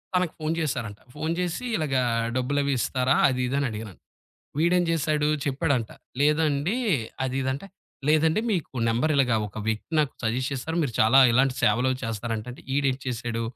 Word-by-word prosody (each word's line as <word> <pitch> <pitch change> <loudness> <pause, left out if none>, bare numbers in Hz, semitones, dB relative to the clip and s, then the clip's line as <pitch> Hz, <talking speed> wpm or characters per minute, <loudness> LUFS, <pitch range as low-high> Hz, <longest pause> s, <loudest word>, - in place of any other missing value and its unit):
తనకు 180 -3 +1
phone 155 +1 -1
చేసారంట 120 -9 -3
phone 155 +2 -2
చేసి 180 +5 -2
ఇలాగ 150 -4 -1 0.4
డబ్బులవి 140 +2 0
ఇస్తారా? 130 +2 +1
అది 130 - -2
ఇది 135 - -2
అని 140 - 0
అడిగారంట. 105 -3 -8 0.6
వీడేం 175 +3 +3
జేసాడు 155 -2 +1 0.2
చెప్పాడంట 135 -5 0 0.3
లేదండి 150 +4 +2 0.5
అది 130 0 -2
ఇది 130 - -1
అంటే. 170 +9 -7 0.4
లేదండి 155 +6 +3
మీకు 170 -9 -2 0.2
నంబరిలగా 130 0 +2
ఒక 100 - -11
వ్యక్తి 110 +8 -3
నాకు 145 -3 +1
సజెస్ట్ 125 +5 0
చేస్తారు. 160 +5 -4
మీరు 125 -6 -2
చాలా 115 +5 +6
ఇలాంటి 130 +2 +3
సేవలు 120 +5 +3
చేస్తారంట, 115 0 -3
అంటే 125 - -12
ఈడేటి 135 -2 +1
చేసాడు 120 -1 -3
135 Hz, 155 wpm, -25 LUFS, 120-155 Hz, 0.6 s, చాలా